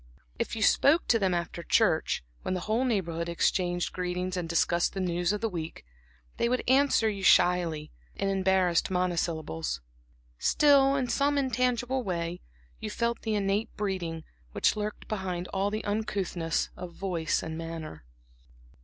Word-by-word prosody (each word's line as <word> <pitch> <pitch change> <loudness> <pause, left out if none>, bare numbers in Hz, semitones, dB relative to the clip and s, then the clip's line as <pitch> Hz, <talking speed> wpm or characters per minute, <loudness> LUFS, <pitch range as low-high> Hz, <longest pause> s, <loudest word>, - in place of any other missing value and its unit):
If - - -2
you 220 - -1
spoke 290 +10 +4
to 230 - +4
them 190 -3 +1
after 170 0 -3
church, 170 - +2 0.2
when 185 - -2
the 180 - -3
whole 225 +6 0
Neighborhood 170 -8 -1
exchanges 175 +1 +1
greetings 180 0 -3
and 175 -2 -3
discusses 170 +1 +2
the 195 - -6
news 175 0 0
of 210 - -2
the 225 - +1
week, 165 - -6 0.5
they 235 - +1
would 250 +1 0
answer 265 -3 +4
you 205 -2 -2
shyly, 175 -5 +3 0.2
in 195 - -1
embarrassed 190 -3 +2
monosyllables. 160 - -1 0.6
Still, 275 -2 +5
in 265 -2 0
some 285 +3 +1
intangible 255 0 0
way, 175 -4 -3 0.4
you 215 - -4
felt 235 +2 -1
the 220 -2 -1
innate 200 +1 0
breeding, 180 -6 -3 0.3
which - - +2
lurked 210 0 -4
behind 185 -4 -3
all 195 +1 0
the 215 +1 -4
uncouthness 195 -5 -1
of 180 -1 -8
voice 170 -4 -1
and 160 0 -5
manner. 165 - -7
185 Hz, 155 wpm, -28 LUFS, 170-220 Hz, 0.6 s, Still